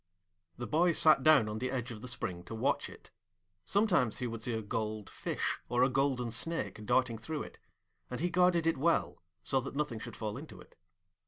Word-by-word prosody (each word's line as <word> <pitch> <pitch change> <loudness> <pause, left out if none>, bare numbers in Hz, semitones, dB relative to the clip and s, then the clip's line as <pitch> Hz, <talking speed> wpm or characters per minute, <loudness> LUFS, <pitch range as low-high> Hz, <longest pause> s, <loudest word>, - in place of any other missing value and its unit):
The 120 - -4
boy 170 +9 +3
sat 155 -3 +6
down 150 -6 +6
on 105 +1 -4
the 130 +2 -2
edge 125 -1 -3
of 110 -2 -8
the 125 - -7
spring 95 -8 -4
to 115 - -7
watch 110 - 0
it; - - -15 0.5
sometimes 175 - +2
he 125 - -3
would 115 -2 -5
see 115 +1 -2
a 110 - -3
gold 110 0 -3
fish - - -2
or 120 +1 +3
a 130 - +4
golden 130 -2 0
snake 125 -2 -1
darting 125 -3 +2
through 155 +5 -4
it, - - -12 0.5
and 125 - -4
he 175 +2 0
guarded 180 -2 +3
it 165 -4 +1
well, 170 +4 +1 0.2
so 135 +7 +2
that 135 +2 -7
nothing 145 -6 -2
should 120 +1 -8
fall 105 -2 -4
into - - -10
it. - - -16
125 Hz, 210 wpm, -32 LUFS, 115-155 Hz, 0.5 s, sat